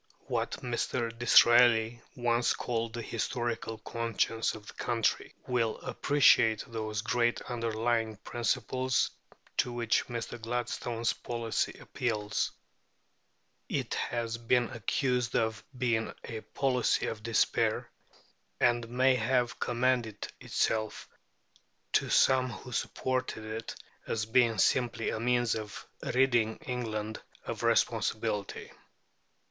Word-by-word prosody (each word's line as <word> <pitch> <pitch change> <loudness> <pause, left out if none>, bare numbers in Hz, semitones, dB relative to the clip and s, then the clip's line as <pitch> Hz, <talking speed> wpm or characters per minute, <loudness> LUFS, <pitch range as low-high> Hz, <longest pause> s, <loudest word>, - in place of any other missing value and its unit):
What - - -1
Mr. 120 -1 -1
Disraeli 120 -1 +6
once 120 -1 +2
called 115 -2 -2
the 120 0 -4
historical 115 0 -2
conscience 115 0 -1
of 105 -1 -11
the - - -10
country 115 -2 -1
will 115 -3 0
appreciate 115 -6 +4
those 110 -3 -4
great 120 -2 +1
underlying 115 -1 -1
principles 130 +4 0 0.5
to 125 - +2
which 120 -1 +1
Mr. 120 0 -5
Gladstone's 120 0 -1
policy 115 -2 -2
appeals. 105 -4 -2 1.2
It - - -2
has 115 -1 -2
been 120 +1 +2
accused 125 +1 0
of 110 -1 0
being 115 -3 0
a 110 -2 -6
policy 130 -1 +1
of 110 -2 -4
despair; 115 0 +1 0.7
and 120 -1 +2
may 130 +2 +4
have 125 0 +1
commended 120 -3 0
itself 110 -1 -1 0.9
to - - +2
some 130 -1 +4
who 125 +2 -9
supported 130 -2 -2
it 110 +1 -5 0.3
as 110 -1 -1
being 115 -1 +3
simply 120 +2 +2
a - - -3
means 120 0 +2
of 110 -1 -6 0.2
ridding 120 -4 +2
England 110 -4 -3 0.2
of - - -4
responsibility. 100 -1 0
115 Hz, 110 wpm, -30 LUFS, 110-125 Hz, 1.2 s, Disraeli